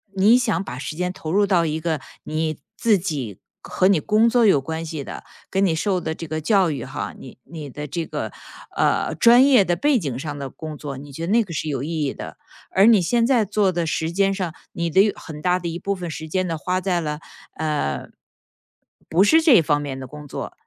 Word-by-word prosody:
你 205 +5 +6
想 230 -6 0
把 125 - -7
时 145 +3 -5
间 180 +2 -1
投 160 -3 -6
入 205 +1 +4
到 175 -4 +3
一 155 0 -1
个 160 -2 -1 0.2
你 155 -1 -2 0.2
自 220 -3 +3
己 140 - -4 0.2
和 185 - +1
你 195 -5 +4
工 220 +7 +3
作 240 -1 +3
有 170 -10 +5
关 160 +4 -4
系 155 -3 -5
的， - - -8 0.3
跟 195 +1 +2
你 165 -4 +1
受 185 +3 0
的 160 -2 -3
这 165 - -7
个 155 +1 -3
教 190 0 +3
育 135 -5 -4
哈， 140 +3 -5
你 130 - -12
你 155 -4 -8
的 150 +3 -6
这 165 +4 -3
个， - - -4 0.5
呃， - - +1
专 240 +3 +6
业 255 -8 +5
的 175 - +1
背 285 +4 +2
景 140 - -3
上 145 +1 -5
的 140 -1 -5
工 155 +2 -8
作， 140 -3 -6
你 140 +1 -10
觉 165 +5 -5
得 - - -1
那 230 0 +4
个 180 -5 -9
是 155 - -3
有 135 -3 -2
意 160 0 -2
义 135 - -2
的。 - - -9 0.3
而 195 - +5
你 220 -4 +6
现 230 +7 +2
在 245 -4 +3
做 205 -1 +1
的 175 -1 -1
时 160 0 -1
间 195 +2 +2
上， 185 -4 -3 0.2
你 170 0 -2
的 195 +6 +4
很 150 -3 -9
大 180 +2 +2
的 175 - -5
一 170 0 -3
部 200 - -1
分 180 -2 -6
时 160 0 -6
间 185 +3 0
呢 165 -2 -2
花 180 +4 -1
在 180 -2 0
了， 150 -1 -3 0.4
呃， 150 - -2 1.0
不 175 +4 +4
是 320 +10 +5
这 280 - +6
方 145 -1 +1
面 135 -2 -5
的 130 - -7
工 150 +2 -10
作。 - - -6
170 Hz, 255 characters per minute, -22 LUFS, 150-195 Hz, 1.0 s, 你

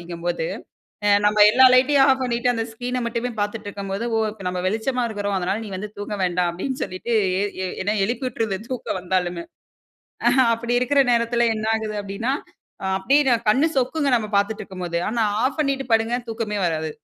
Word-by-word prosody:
அப்டிங்கும்போது. 170 -1 -3 0.6
அ - - +4 0.2
நம்ம 210 0 +4
எல்லா 260 +4 +7
லைட்யும் 270 +2 +5
ஆஃப் 265 0 +2
பண்ணிட்டு. 245 0 +1
அந்த 225 0 -1
ஸ்கிரீன 250 +2 -3
மட்டுமே 235 +1 -2
பார்த்துட்டுருக்கும் 205 -2 -4
போது 225 +4 -3
ஓ - - +2 0.3
நம்ம 180 0 -3
வெளிச்சமா 245 +4 -1
இருக்கிறோம் 205 -2 -2
அதுனால 190 +5 -2
நீ - - -8
வந்து 210 +3 -5
தூங்க 205 +1 -4
வேண்டாம் 180 -1 +1
அப்டின் 260 +9 -4
சொல்லிட்டு 205 +6 -4 0.3
எ - - +1 0.2
எ - - -2 0.2
என்ன 210 +2 0
எழுப்பி 250 +3 -2
உட்டுருது 215 -5 -2
தூக்கம் 245 -6 -3
வந்தாலுமே. 180 -2 -1 0.8
அ - - +8 0.3
அப்டி 235 +1 -3
இருக்கிற 275 +3 +3
நேரத்தில 235 0 +2
என்ன 215 0 -3
ஆகுது 215 -1 -3
அப்டின்னா, 210 +6 -2 0.7
அப்டியே 270 +5 +3 0.2
கண்ணு 270 +9 +3
சொக்குங்க 280 +3 0
நம்ம 215 -1 -5
பார்த்துட்டு 210 +2 0
இருக்கும்போது. 180 -3 -4
ஆனா 230 -1 0 0.2
ஆஃப் 275 +4 -1
பண்ணிட்டு 275 -2 0
படுங்க 225 +2 +1 0.2
தூக்கமே 220 -2 -3
வராது. 160 -1 -2
220 Hz, 175 wpm, -22 LUFS, 195-250 Hz, 0.8 s, அ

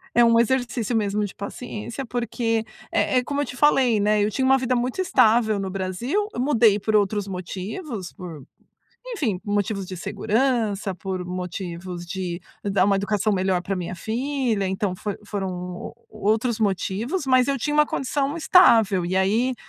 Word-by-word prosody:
É 240 0 +6
um 230 0 +5
exercício 240 -2 0
mesmo 210 -1 0
de 200 - -7
paciência, 230 +4 -6
porque 230 -2 -1 0.3
é 225 +4 +2
é - - -3
como 285 +2 -2
eu - - 0
te 250 - -8
falei, 260 -7 +4
né. 210 0 +2
Eu 210 - +1
tinha 260 +5 0
uma 265 0 +5
vida 255 -1 0
muito 250 +9 -1
estável 220 - +3
no 190 -1 -3
Brasil, 200 - -2
eu - - -5
mudei 230 -7 +4
por 215 +2 0
outros 205 0 +1
motivos, 195 - -6
por 170 -8 -9 0.6
enfim, 265 - -2
motivos 205 -1 -1
de 185 - -6
segurança, 220 -2 0
por 185 0 -4
motivos 180 -1 -5
de 180 -1 -4 0.2
dar 195 -2 +2
uma 200 -1 +3
educação 205 +1 0
melhor 185 -1 +1
pra 195 +1 -3
minha 180 0 -4
filha. 235 -1 -1
Então, 190 0 -1
foi 205 +2 -4
foram 195 -3 -3
u 180 0 -6
o 205 - -2
outros 225 +1 +1
motivos, 220 - -1
mas 255 -1 +4
eu 275 -1 +1
tinha 295 +5 -2
uma 300 0 +5
condição 280 +3 -1
estável. 225 - +5
E 185 +2 -2
aí, 220 +7 +2
215 Hz, 175 wpm, -23 LUFS, 190-250 Hz, 0.6 s, É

